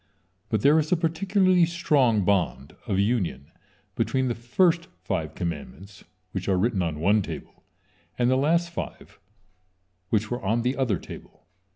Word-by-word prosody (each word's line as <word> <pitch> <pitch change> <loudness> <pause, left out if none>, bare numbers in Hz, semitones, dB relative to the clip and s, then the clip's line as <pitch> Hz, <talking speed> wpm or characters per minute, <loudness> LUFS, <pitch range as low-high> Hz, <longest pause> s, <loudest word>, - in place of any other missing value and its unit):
But 110 -3 0
there 150 +3 +6
is 155 0 -2
a 180 - +4
particularly 185 +2 +2
strong 140 - +2
bond 90 -9 0
of 95 - 0
union 100 - -1 0.4
between 130 -1 0
the - - 0
first 170 +9 +1 0.2
five 80 -6 -3
commandments, 90 +4 -6 0.3
which 95 +1 -4
are 95 - +3
written 100 0 +1
on 80 -3 -2
one 100 +6 +3
table, - - -8 0.5
and 120 - +2
the 130 - +3
last 170 +5 +2
five, - - -7 0.9
which 110 +1 0
were 120 - -2
on 115 +4 +1
the 125 +2 0
other 125 -8 0
table. - - -12
120 Hz, 155 wpm, -25 LUFS, 95-155 Hz, 0.9 s, there